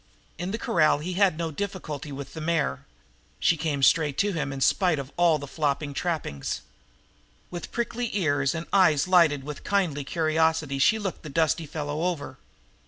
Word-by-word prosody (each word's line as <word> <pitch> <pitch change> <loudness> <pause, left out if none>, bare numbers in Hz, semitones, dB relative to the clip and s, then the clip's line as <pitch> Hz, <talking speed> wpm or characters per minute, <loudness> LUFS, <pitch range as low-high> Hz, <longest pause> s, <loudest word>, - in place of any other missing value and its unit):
In 175 +1 -3
the 215 - -2
corral 155 -9 +3
he 170 +5 -4
had 185 -3 +3
no 165 -1 -2
difficulty 160 -5 -5
with 140 0 -7
the 160 - -6
mare. 155 - -1 0.5
She 170 - +3
came 150 -3 -2
straight 150 -1 +4
to 205 0 +2
him 150 -4 -2
in 135 - -5
spite 175 +4 +3
of 140 0 -6
all 170 -3 +4
the 145 - -7
flopping 145 0 -2
trappings. 155 - -3 0.9
With 175 -1 -6
prickly 235 0 -2
ears 145 -5 +1
and 165 +1 -4
eyes 175 -6 +4
lighted 165 -7 +4
with 150 0 -7
kindly 180 -8 0
curiosity 160 -2 +1
she 220 +10 +4
looked 200 -4 -4
the 155 - -8
dusty 160 +1 +1
fellow 150 0 -4
over. 145 -7 -3
160 Hz, 170 wpm, -26 LUFS, 145-175 Hz, 0.9 s, straight